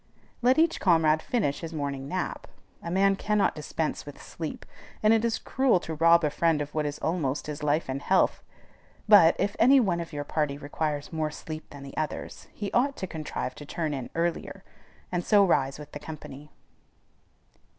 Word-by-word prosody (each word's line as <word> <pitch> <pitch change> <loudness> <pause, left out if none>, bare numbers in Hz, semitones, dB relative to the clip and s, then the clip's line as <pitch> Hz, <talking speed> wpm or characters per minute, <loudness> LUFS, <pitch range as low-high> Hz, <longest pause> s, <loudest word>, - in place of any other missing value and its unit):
Let 250 +3 +4
each 325 +1 +3
comrade 160 -4 +3
finish 205 - -1
his 165 -1 -7
morning 140 -2 -3
nap. 185 +4 -3 0.3
A 170 - -6
man 195 +2 +3
cannot 210 +1 +1
dispense 155 0 -3
with 145 - -11
sleep, 160 -2 -7 0.4
and 215 +1 +6
it 225 0 +2
is 230 -1 +1
cruel 260 -7 +2
to 160 - -5
rob 165 +2 +5
a 150 - +1
friend 165 0 +2
of 145 0 -5
what 155 -1 0
is 145 0 -4
almost 155 -5 -1
his 150 0 -6
life 150 +2 +1
and 135 +1 -3
health. 190 +4 +2 0.7
But, 195 -6 +7
if 200 +2 -1
any 265 +4 +7
one 185 -8 +1
of 170 - -6
your 145 -1 -4
party 145 -1 -1
requires 145 +1 -3
more 155 -1 -1
sleep 155 +1 -8
than 140 -1 -10
the 140 - -10
others, 155 - -4
he 205 -2 -5
ought 275 +3 +1
to - - -3
contrive 155 -6 -5
to 145 - -10
"turn 155 -2 -2
in" 130 -3 -5
earlier, 170 +1 -2 0.5
and 175 -1 -1
so 205 +1 +5
rise 135 -6 +1
with 150 -1 -11
the 145 - -7
company. 150 -1 -9
160 Hz, 190 wpm, -27 LUFS, 145-190 Hz, 0.7 s, But